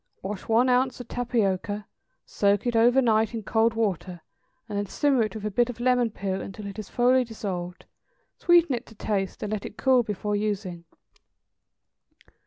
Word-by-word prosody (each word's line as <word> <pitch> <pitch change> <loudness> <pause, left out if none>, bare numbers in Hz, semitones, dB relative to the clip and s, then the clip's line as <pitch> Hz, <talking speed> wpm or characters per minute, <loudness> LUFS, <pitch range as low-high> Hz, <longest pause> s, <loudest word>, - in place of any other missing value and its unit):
= - - -44
Wash 195 0 -5
one 230 +3 +4
ounce 255 +1 +2
of 245 - -8
tapioca, 210 -4 -1 0.4
soak 200 +1 +1
it 240 -1 0
over 240 +4 +5
night 220 0 +2
in 220 - -4
cold 225 +2 +2
water, 185 -5 -2 0.5
and 210 - -6
then 205 - -3
simmer 275 +2 +2
it 215 0 -1
with 215 -1 -6
a 210 - -1
bit 240 +4 +2
of 245 - -7
lemon 245 -1 +2
peel 195 -2 -3
until 200 +3 -8
it 200 +1 -7
is 210 - -7
thoroughly 250 +1 +3
dissolved; 185 -6 -6 0.5
sweeten 345 -4 +4
it 240 0 -4
to 225 - -15
taste, 200 -2 -2
and 210 0 -3
let 210 - -3
it - - -9
cool 260 -2 +4
before 210 -1 -3
using. 195 -5 -3
220 Hz, 185 wpm, -26 LUFS, 200-245 Hz, 0.5 s, over